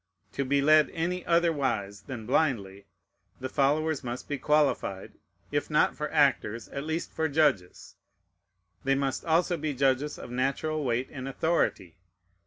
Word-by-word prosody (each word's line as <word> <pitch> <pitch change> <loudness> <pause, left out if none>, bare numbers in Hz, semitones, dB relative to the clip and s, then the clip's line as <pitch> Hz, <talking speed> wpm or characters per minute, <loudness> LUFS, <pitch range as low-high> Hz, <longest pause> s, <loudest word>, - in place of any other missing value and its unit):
To 140 - -2
be 140 +1 +1
led 155 +1 +5
any 175 +2 -2
otherwise 135 - +1
than 115 0 -7
blindly, 100 -8 0 0.5
the 130 - -4
followers 150 +3 +1
must 120 0 -5
be 145 -2 -3
qualified, 145 -10 0 0.4
if - - -1
not - - +3
for - - -4
actors, 110 -1 +1
at 140 +1 -5
least 160 +2 -3
for 160 0 0
judges; 140 - 0 0.9
they 135 0 +2
must 135 -1 -1
also 170 +2 +2
be 155 -2 -3
judges 135 +2 +1
of 120 - -9
natural 140 +5 -1
weight 125 0 -1
and 130 -2 -6
authority. 135 - -1
140 Hz, 145 wpm, -28 LUFS, 125-155 Hz, 0.9 s, led